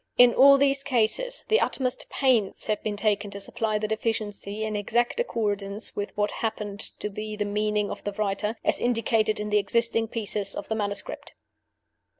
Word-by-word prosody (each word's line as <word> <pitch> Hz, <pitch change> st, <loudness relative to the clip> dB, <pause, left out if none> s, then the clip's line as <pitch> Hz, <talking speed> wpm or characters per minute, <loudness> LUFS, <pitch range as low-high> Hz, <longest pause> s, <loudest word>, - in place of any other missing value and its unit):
In 245 Hz, -1 st, +7 dB
all 275 Hz, +1 st, +7 dB
these 275 Hz, 0 st, +2 dB
cases 280 Hz, -, +1 dB
the 440 Hz, -, +4 dB
utmost 255 Hz, -2 st, -1 dB
pains 245 Hz, -8 st, +1 dB
have 215 Hz, -1 st, -1 dB
been 210 Hz, -1 st, -3 dB
taken 205 Hz, -1 st, 0 dB
to 200 Hz, 0 st, -6 dB
supply 215 Hz, +1 st, -1 dB
the 215 Hz, 0 st, -2 dB
deficiency 215 Hz, -1 st, -3 dB
in 215 Hz, -1 st, -2 dB
exact 235 Hz, -, 0 dB
accordance 205 Hz, -, -2 dB
with 205 Hz, 0 st, -5 dB
what 205 Hz, 0 st, +1 dB
appeared 210 Hz, -2 st, -3 dB
to 210 Hz, -, -4 dB
be 215 Hz, +1 st, -5 dB
the 210 Hz, 0 st, -2 dB
meaning 210 Hz, 0 st, 0 dB
of -, -, -7 dB
the 205 Hz, -, -3 dB
writer, 210 Hz, +1 st, -1 dB
as -, -, +2 dB
indicated 225 Hz, -2 st, +1 dB
in 210 Hz, 0 st, -4 dB
the 210 Hz, -, +4 dB
existing 225 Hz, +2 st, +1 dB
pieces 210 Hz, -3 st, -1 dB
of -, -, -6 dB
the 220 Hz, -, 0 dB
manuscript. 205 Hz, -2 st, -3 dB
215 Hz, 175 wpm, -26 LUFS, 205-235 Hz, -, In